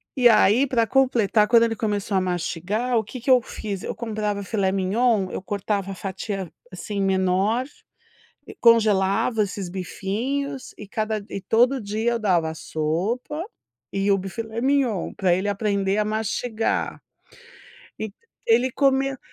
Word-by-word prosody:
e 245 -2 +6
aí 230 +4 +5
para 235 -3 +2
completar 235 -5 +3
quando 230 0 +6
ele 230 -1 +1
começou 205 -2 -2
a 190 - +3
mastigar 185 +7 -1
o 220 - +1
que 255 +5 -8
que 250 +3 +1
eu 250 -1 +6
fiz, 205 -4 -6
eu - - -5
comprava 210 -3 -3
Filet 195 -1 0
MIgnon 195 +1 +1
eu - - -4
cortava 200 0 -2
a - - -6
fatia, 190 -1 -5 0.2
assim, 200 +2 -4
menor, 195 +5 +1 1.0
congelava 215 -1 +4
esses 195 -2 -5
bifinhos 240 +10 -3
e 210 - -9
cada 215 +1 -2
d 200 - -8
e - - -3
todo 245 +7 +3
dia 220 +3 -1
eu 235 - 0
dava 180 -7 +1
a - - -6
sopa 185 - -2 0.5
e 195 +1 0
o 195 - +3
bi 195 +1 -5
filet 225 +3 -5
mignon, 260 -8 +1
para 185 -2 +1
ele 190 +3 -1
aprender 200 -1 0
a 210 - +2
mastigar, 220 +1 -2 1.0
e 215 -2 -4 0.3
ele 240 +3 +4
comia 270 0 +1
210 Hz, 155 wpm, -23 LUFS, 195-235 Hz, 1.0 s, e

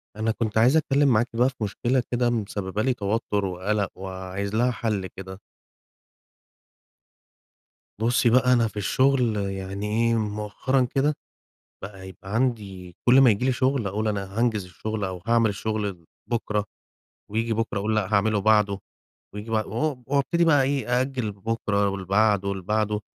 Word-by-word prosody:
أنا 110 +1 0
كنت 110 -1 -2
عايز 125 +7 +5
أتكلّم 145 -2 +2
معاكِ 120 -1 +3
بقى 125 +3 +3
في 135 - -15
مشكلة 120 +5 0
كده 120 0 +2
مسبّبة 105 -3 -2
لي 130 +2 +2
توتُّر 105 -2 -1
وقلَق 95 +2 -1
وعايز 95 +2 -5
لها 120 +3 +2
حل 105 -5 -2
كده. 95 0 -10 2.6
بُصّي 120 +1 +3
بقى، 125 +1 +4
أنا 115 -2 +3
في 110 - -10
الشغل 125 +2 +2
يعني 95 0 -4
إيه، 115 +2 +1
مؤخرًا 105 +5 -1
كده 145 +2 +3 0.7
بقى 95 -2 -8
يبقى 95 +2 -9
عندي 100 -8 -2
كلّ 130 +2 +8
ما 130 -3 +7
ييجي 105 +3 0
لي 130 - +3
شغل 130 -2 0
أقول 105 +3 -1
أنا 100 0 -3
هانجز 115 -4 +1
الشغل 105 +4 -4
أو 95 -2 -5
هاعمل 115 -1 +3
الشغل 100 -4 -3 0.2
بُكرة. 105 -3 -1 0.7
وييجي 115 +2 -1
بُكرة 115 0 -1
أقول 105 +2 -1
لأ 105 -3 +1
هاعمله 105 +1 +2
بعده، 105 -1 +3 0.6
وييجي 105 +2 -7
بع 110 -1 +1
و 130 +4 -2
وابتدي 145 +5 +1
بقى 145 -4 +5
إيه، 130 -3 0
آجَل 130 -3 -3
لبُكرة 100 0 -1
ولبعده 100 +1 +1
ولبعده، 105 +2 -1
110 Hz, 150 wpm, -25 LUFS, 100-120 Hz, 2.6 s, كلّ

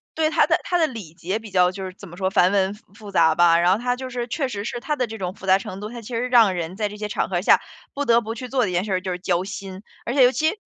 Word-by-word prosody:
对， 315 -1 +2
它 - - +3
的 - - +2
它 355 - 0
的 320 - +3
礼 215 - -9
节 185 +5 -3
比 220 -2 -11
较 180 -1 +4
就 190 0 -6
是 185 - -7
怎 195 0 -13
么 175 - -12
说， 190 0 0
繁 180 -1 +4
文 195 -1 +1 0.2
复 205 -1 -11
杂 160 -4 +4
吧， 170 0 +5
然 175 +1 +4
后 190 - +3
它 245 +2 -1
就 260 0 -7
是 245 -1 -4
确 280 +1 -2
实 205 -5 -5
是 240 - -4
它 300 +5 -2
的 255 -3 0
这 225 -1 -8
种 185 0 -4
复 - - -11
杂 190 0 +4
程 190 -1 -7
度， 210 +1 -6
它 240 0 -8
其 215 - -12
实 230 - 0
是 - - -1
让 225 -6 +5
人 170 +1 -4
在 210 0 -1
这 210 - -9
些 210 0 -4
场 210 - -2
合 180 -2 0
下， - - +5 0.3
不 285 +1 -2
得 235 -1 +4
不 225 0 -5
去 250 +2 -7
做 260 -1 +1
的 210 - 0
一 - - -5
件 175 +1 +1
事 205 - -2
儿 185 - 0
就 185 -1 -4
是 180 - -4
交 180 -1 0
心。 195 0 -8 0.2
而 240 - -2
且 270 - +6
尤 250 - +6
其 315 +4 +1
205 Hz, 365 characters per minute, -23 LUFS, 185-240 Hz, 0.3 s, 且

